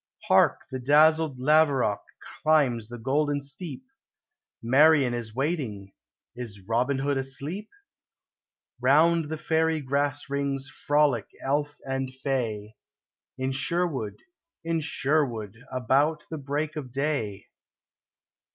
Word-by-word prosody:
Hark! - - +4
The 130 - -3
dazzled 155 +2 +4
laverock 140 -6 +3 0.4
climbs 130 -8 +2
the 120 - -7
golden 145 +4 0
steep; 150 - -7 0.8
Marian 135 +1 +5
is 115 -2 -5
waiting: 130 - -3 0.4
is 105 -6 -8
Robin 125 +4 +1
Hood 140 +1 0
asleep? 140 +10 -4 1.1
Round 155 +6 +4
the 160 - -3
fairy 160 0 +1
grass 145 +1 -1
rings 140 -1 -2
frolic 145 -6 +1 0.2
elf 145 +2 0
and 135 -1 -2
fay, 120 -6 -3 0.6
In 130 0 -1
Sherwood, 140 -4 -1 0.5
in 165 0 0
Sherwood, 130 -8 -1
about 140 +5 +1
the 160 - -4
break 145 +3 -3
of 135 -5 -6
clay. 135 -7 -2
140 Hz, 105 wpm, -27 LUFS, 125-150 Hz, 1.1 s, Marian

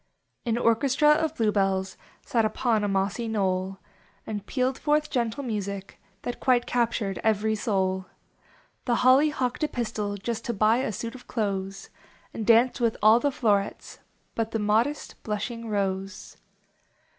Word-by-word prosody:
An 230 0 +1
orchestra 255 +5 +3
of 315 +1 +1
Blue 220 -5 +1
Hells 195 -1 0 0.3
Sat 230 -2 +1
upon 220 0 +1
a - - +1
mossy 200 +4 -1
knoll 190 -3 -1 0.5
And 205 -2 -4
pealed 260 0 0
forth 300 0 +1
gentle 240 +1 -1
music 200 -4 -5 0.2
That 245 - -4
quite 245 -2 +3
captured 230 -5 -1
every 220 0 +2
soul. 190 -3 -1 0.8
The 240 - +2
Holly 270 +4 +6
hocked 260 -1 -2
a - - +3
pistil 215 -6 -3
Just 220 +3 -4
to 235 -3 -2
buv 220 +5 +3
a - - -1
suit 230 +3 -5
of 255 - -13
clothes. 195 -3 -3 0.4
And 220 - -5
danced 240 +3 +4
with 230 -2 +1
all 220 +2 +7
the 285 - +1
flowerets 205 -7 -1 0.4
Uni 225 -1 -1
the 225 - -2
modest, 220 +7 0
blushing 225 +2 -4
Rose. 195 -1 -3
225 Hz, 150 wpm, -26 LUFS, 200-245 Hz, 0.8 s, all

